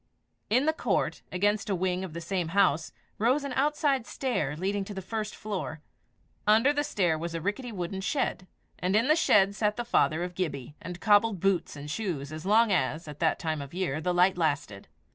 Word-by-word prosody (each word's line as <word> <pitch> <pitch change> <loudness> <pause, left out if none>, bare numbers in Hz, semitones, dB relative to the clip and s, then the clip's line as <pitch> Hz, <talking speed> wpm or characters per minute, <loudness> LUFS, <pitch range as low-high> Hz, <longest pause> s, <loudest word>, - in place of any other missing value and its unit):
In 255 +6 +3
the 315 - +3
court, - - -1
against 205 +4 +1
a 195 - +1
wing 185 0 -1
of 180 -4 -6
the 170 - -5
same 175 0 -2
house, 160 -5 +3 0.3
rose 255 +7 +2
an 280 -2 -4
outside 280 -2 +1
stair, 190 - -1
leading 195 +3 -1
to 205 - -8
the - - -3
first 215 +2 -4
floor; 195 -7 -4 0.7
under 225 +7 +5
the 290 0 0
stair 175 - 0
was 170 +1 -4
a - - -1
rickety 205 +8 -3
wooden 190 -1 -4
shed; 190 -4 -1 0.3
and 185 +2 0
in 230 +4 +3
the 310 - +5
shed 200 -11 +4
sat 210 0 0
the 240 - -3
father 170 -7 +2
of 180 0 -5
Gibbie, 145 -8 -4
and 180 0 -7
cobbled 205 -1 +4
boots 195 -3 0
and 145 0 -8
shoes 155 -5 -3
as 155 +4 -6
long 220 +1 +5
as, 165 -3 0
at 150 -1 -9
this 160 -2 +2
time 160 -3 -2
of 140 - -7
the 170 - -10
year, 155 -5 -1
the 180 +2 0
light 180 +1 +3
lasted. 145 -11 -1
190 Hz, 210 wpm, -28 LUFS, 165-220 Hz, 0.7 s, under